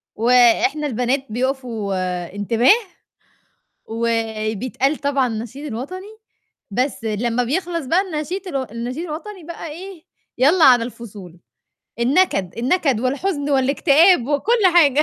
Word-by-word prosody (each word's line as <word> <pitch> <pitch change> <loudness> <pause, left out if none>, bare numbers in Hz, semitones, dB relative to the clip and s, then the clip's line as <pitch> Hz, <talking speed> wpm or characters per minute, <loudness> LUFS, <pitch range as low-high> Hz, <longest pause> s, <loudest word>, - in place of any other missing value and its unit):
وإحنا 250 - +3
البنات 255 +2 -1
بيقفوا 240 -4 -3 0.4
انتباه، 230 - +3 1.1
وبيتقال 225 +4 -1
طبعًا 280 -3 0
النشيد 235 +6 -6
الوطني، 370 - -7 0.5
بس 250 +2 -2
لمّا 230 +3 -1
بيخلص 335 +3 -2
بقى 345 +8 +2
النشيد 365 +2 -5
الو 275 -6 -2
النشيد 245 +7 -5
الوطني 350 +4 -8
بقى 330 -1 -8
إيه، 365 +1 -10 0.3
يالّا 310 +7 +4
على 245 -3 +6
الفصول، 205 -7 -10 0.6
النكد 235 - +1
النكد 265 -2 +1
والحزن 285 +3 -2
والاكتئاب 280 +3 +4
وكُل 420 - +1
حاجة 300 -3 +5
265 Hz, 110 wpm, -20 LUFS, 235-325 Hz, 1.1 s, على